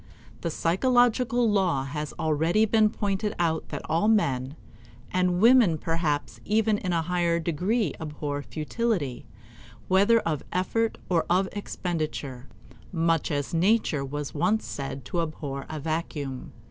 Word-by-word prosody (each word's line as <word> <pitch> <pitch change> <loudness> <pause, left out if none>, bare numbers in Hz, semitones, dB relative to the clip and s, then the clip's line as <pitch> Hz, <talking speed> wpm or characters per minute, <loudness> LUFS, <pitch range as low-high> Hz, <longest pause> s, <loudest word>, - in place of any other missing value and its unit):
The - - -1
psychological 245 - +2
law 185 -10 +2
has 150 +2 -4
already 165 +6 +2
been 215 0 +4
pointed 205 0 -2
out 160 -2 0
that - - -5
all 165 +6 +1
men 140 -11 +1 0.6
and 180 -1 +1
women 230 -6 +6
perhaps 160 -2 -2
even 215 0 +2
in 185 - -2
a 165 -1 +1
higher 170 0 +1
degree 180 +8 0
abhor 150 -2 -4
futility, 155 - -2 0.6
whether 200 +5 +5
of 155 -4 -2
effort 225 +5 0
or 170 -3 +1
of 185 +2 +3
expenditure 155 -9 -4 0.4
much 165 -2 +1
as 145 +2 -2
Nature 175 -4 +2
was 145 +1 -5
once 180 +8 +1
said 135 -2 -5
to 170 +6 -1
abhor 145 -4 -5
a 155 - -4
vacuum. 150 -4 -4
170 Hz, 135 wpm, -26 LUFS, 150-205 Hz, 0.6 s, women